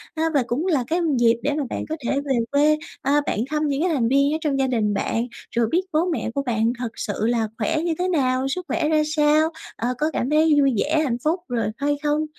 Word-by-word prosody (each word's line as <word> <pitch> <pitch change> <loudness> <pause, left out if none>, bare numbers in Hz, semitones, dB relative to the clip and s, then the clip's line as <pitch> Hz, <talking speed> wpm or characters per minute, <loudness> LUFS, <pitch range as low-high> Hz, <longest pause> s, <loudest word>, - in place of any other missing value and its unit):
A, 320 - -1
và 280 -3 +3
cũng 275 +8 -1
là 300 -9 +2
cái 335 +4 0 0.2
dịp 230 -1 +4
để 290 - +1
mà 295 0 -1
bạn - - -4
có 315 - -1
thể 275 +3 0
về 270 -2 +1 0.2
quê, 300 +2 +4 0.2
a, 290 +2 +2
bạn - - -1
thăm 300 0 0
những 280 0 -1
cái 360 - +2
thành 245 -6 +1
viên 280 +3 +3
ở - - +1
trong 285 -4 0
gia 265 - +2
đình 220 -5 0
bạn, 230 +4 -1 0.3
rồi 235 -1 +2
biết 345 - +3
bố 315 +3 +2
mẹ 330 -9 -2
của 280 - +1
bạn 230 -1 +1
thật 245 -2 -2
sự 205 - -3
là 230 -2 +1
khỏe 245 +8 0
như 340 -1 0
thế 365 - +1
nào, 265 -6 +1
sức 360 +6 -3
khỏe 300 - 0
ra 310 -1 +3
sao, 305 +1 +3 0.3
ờ, 245 +2 -2
có 305 +3 0
cảm 250 - -1
thấy 310 0 +4
vui 275 -2 +3
vẻ, 310 +7 +1
hạnh 245 -5 -1
phúc 325 +4 +1
rồi 240 -5 -1
hay 290 +1 0
không? 300 +1 +1
285 Hz, 255 wpm, -23 LUFS, 245-310 Hz, 0.3 s, dịp